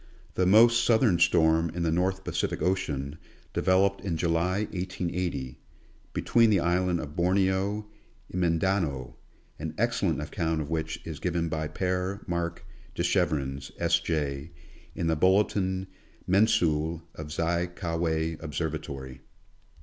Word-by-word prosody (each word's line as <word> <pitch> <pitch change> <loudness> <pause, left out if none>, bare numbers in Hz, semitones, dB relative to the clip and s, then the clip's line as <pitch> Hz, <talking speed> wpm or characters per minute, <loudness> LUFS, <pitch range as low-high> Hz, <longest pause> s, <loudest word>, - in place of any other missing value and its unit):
The 90 - +1
most 115 +4 +6
southern 110 -6 +4
storm 80 -1 +4
in 85 - -1
the 80 - +1
North 95 +3 0
Pacific - - -2
ocean, 75 -6 -1 0.3
developed 95 +1 +2
in 90 -5 -2
July, 85 +4 +1
1880, 90 -7 -3 0.5
between 115 -1 +3
the 100 -3 +4
Island 90 0 +1
of 75 -1 -7
Borneo 95 +3 +1 0.5
and 90 - -2
Mindanao, 85 -6 0 0.4
an - - -5
excellent - - +1
account 80 -1 -2
of 75 0 -4
which 80 0 -2
is 80 -3 -6
given 85 -2 -1
by 80 -1 -2
P^re 95 +3 -2
Mark 85 0 -3 0.3
Dechevrens, 75 -7 0
S. 85 0 +2
J., 75 -3 -2 0.5
in 85 - -2
the 80 -1 +2
Bulletin 95 +1 +2 0.4
Mensuelle 85 -5 +2
of 80 -1 -8
Zi 85 +2 0
Ka 85 -1 -4
Wei 80 -1 0
Observatory. 75 -5 -5
85 Hz, 125 wpm, -28 LUFS, 80-95 Hz, 0.5 s, most